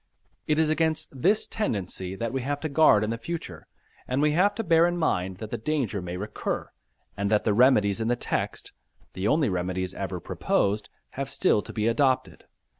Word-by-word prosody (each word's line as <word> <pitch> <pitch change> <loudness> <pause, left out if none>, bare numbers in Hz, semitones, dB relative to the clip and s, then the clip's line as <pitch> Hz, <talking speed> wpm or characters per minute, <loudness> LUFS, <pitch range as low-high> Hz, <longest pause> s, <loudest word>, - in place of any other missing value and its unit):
It 150 - +2
is 160 -1 +3
against 160 0 0
this 190 - +2
tendency 95 - -3
that 115 +4 -3
we 135 - -1
have 145 +3 -2
to 155 - -2
guard 140 -8 +5
in 105 - -1
the 115 - -3
future, 170 +7 -6 0.4
and 130 +2 -1
we 150 +1 +3
have 195 +6 +3
to 225 - -2
bear 165 -2 +4
in 175 0 -1
mind 95 - 0
that 110 +1 -8
the - - -3
danger 120 -6 -1
may 90 0 -5
recur, 105 +3 -4 0.4
and 100 0 -1
that 105 0 +2
the 105 - +2
remedies 110 -3 +4
in 110 - -1
the 120 - +2
text - - -3 0.4
(the 95 +2 -2
only 150 +4 +3
remedies 90 -1 -2
ever - - -4
proposed) 105 +1 -1 0.2
have - - -4
still 105 - +2
to - - -9
be 105 - -2
adopted. 130 +2 +1
120 Hz, 195 wpm, -26 LUFS, 100-155 Hz, 0.4 s, guard